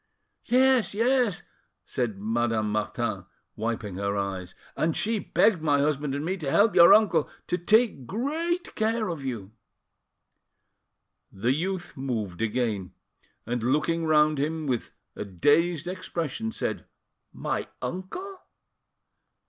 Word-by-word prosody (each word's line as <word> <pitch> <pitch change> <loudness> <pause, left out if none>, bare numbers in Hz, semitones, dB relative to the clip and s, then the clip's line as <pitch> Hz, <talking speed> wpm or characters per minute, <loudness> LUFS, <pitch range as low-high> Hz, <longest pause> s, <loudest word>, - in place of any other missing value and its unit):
"Yes, 255 -3 +3
yes," 240 -3 +2 0.4
said 120 -5 -2
Madame 110 0 0
Martin, 105 -2 -2 0.3
wiping 110 -4 -3
her 100 +1 -1
eyes; 95 -2 -4 0.2
"and 160 0 +1
she 220 0 +1
begged 195 -3 +2
my 145 -2 +3
husband 145 -1 0
and 145 +2 -3
me 190 +3 -1
to 150 -6 -3
help 205 +9 +4
your 170 -1 +8
uncle 190 -8 +5 0.2
to 180 - 0
take 215 - +2
great 325 - -2
care 220 -1 0
of 160 -5 -5
you—" 115 -7 -5 1.8
The 115 +7 0
youth 180 +4 -3
moved 115 - -3
again, 110 -5 -1 0.5
and 120 +1 -2
looking 150 +7 +1
round 150 -1 +4
him 155 +2 -1
with 125 -5 -2 0.2
a - - -4
dazed 150 - +2
expression, 185 - -3
said, - - -3 0.5
"My - - -3
uncle—?" 365 - -6
150 Hz, 125 wpm, -27 LUFS, -, 1.8 s, your